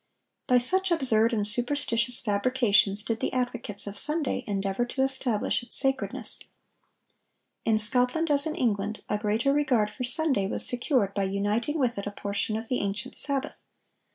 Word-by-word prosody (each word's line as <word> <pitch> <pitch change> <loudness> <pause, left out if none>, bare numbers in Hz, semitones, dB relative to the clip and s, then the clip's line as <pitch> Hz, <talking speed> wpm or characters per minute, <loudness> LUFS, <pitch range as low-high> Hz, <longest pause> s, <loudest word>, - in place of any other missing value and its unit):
By 250 - +3
such 375 +10 +1
absurd 240 -9 +1
and 210 -3 -1
superstitious 240 +1 0
fabrications 210 -2 +1
did 225 +1 -4
the - - -3
advocates 245 -5 -2
of 200 0 -2
Sunday 300 -1 -2
endeavor 195 +2 -2
to 265 +2 -3
establish 260 -6 -1
its 240 - -5
sacredness.(1012) 270 -1 +1 1.2
In 220 -1 +2
Scotland, 250 +8 +1
as 285 +2 +4
in 310 - -4
England, 210 -3 -3
a 210 - -2
greater 220 +6 0
regard 255 -8 0
for 255 - -7
Sunday 255 -5 +2
was - - +4
secured 245 -5 +2
by 200 -1 -2
uniting 205 +9 -2
with 245 -7 -1
it 200 - -6
a - - -4
portion 205 +2 -3
of 225 +1 -7
the 250 - -2
ancient 205 +6 -4
Sabbath. 280 +1 +4
240 Hz, 160 wpm, -26 LUFS, 210-265 Hz, 1.2 s, as